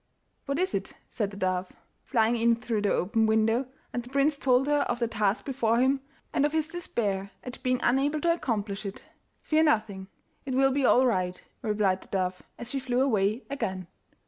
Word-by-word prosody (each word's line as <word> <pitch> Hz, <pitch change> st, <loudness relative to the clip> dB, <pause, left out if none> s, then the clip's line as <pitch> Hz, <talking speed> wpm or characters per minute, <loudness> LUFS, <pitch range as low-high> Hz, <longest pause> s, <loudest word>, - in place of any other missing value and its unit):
'What 280 Hz, 0 st, -1 dB
is 370 Hz, +2 st, 0 dB
it?' -, -, -3 dB, 0.2 s
said 210 Hz, -4 st, -1 dB
the 200 Hz, -, -10 dB
dove, 185 Hz, -1 st, -1 dB, 0.3 s
flying 230 Hz, -2 st, +2 dB
in 235 Hz, 0 st, +3 dB
through 230 Hz, -2 st, -2 dB
the 205 Hz, -, +1 dB
open 220 Hz, +4 st, +2 dB
window, 225 Hz, +3 st, +2 dB, 0.3 s
and 245 Hz, -, -1 dB
the 245 Hz, -, -12 dB
prince 280 Hz, +3 st, +2 dB
told 260 Hz, -1 st, +3 dB
her 295 Hz, 0 st, +2 dB
of -, -, 0 dB
the 235 Hz, -1 st, 0 dB
task 215 Hz, -2 st, 0 dB
before 235 Hz, -4 st, +1 dB
him, 265 Hz, +2 st, +3 dB, 0.3 s
and -, -, +2 dB
of 295 Hz, +1 st, +1 dB
his 315 Hz, -1 st, +1 dB
despair 210 Hz, -, -2 dB
at 250 Hz, 0 st, -8 dB
being 255 Hz, -1 st, +1 dB
unable 275 Hz, +5 st, +2 dB
to 335 Hz, +1 st, +3 dB
accomplish 210 Hz, -10 st, -2 dB
it. 195 Hz, -1 st, -7 dB, 0.4 s
'Fear 310 Hz, 0 st, +2 dB
nothing; 215 Hz, -10 st, +1 dB, 0.4 s
it 265 Hz, -2 st, -3 dB
will 270 Hz, +1 st, +4 dB
be 275 Hz, 0 st, +1 dB
all 255 Hz, -, +5 dB
right,' 185 Hz, -6 st, 0 dB, 0.2 s
replied 210 Hz, -4 st, +1 dB
the -, -, -16 dB
dove, 185 Hz, -1 st, -2 dB, 0.2 s
as 235 Hz, 0 st, -7 dB
she 275 Hz, -, -1 dB
flew 255 Hz, -1 st, 0 dB
away 215 Hz, -2 st, +1 dB
again. 190 Hz, -10 st, -3 dB
235 Hz, 195 wpm, -28 LUFS, 205-270 Hz, 0.4 s, all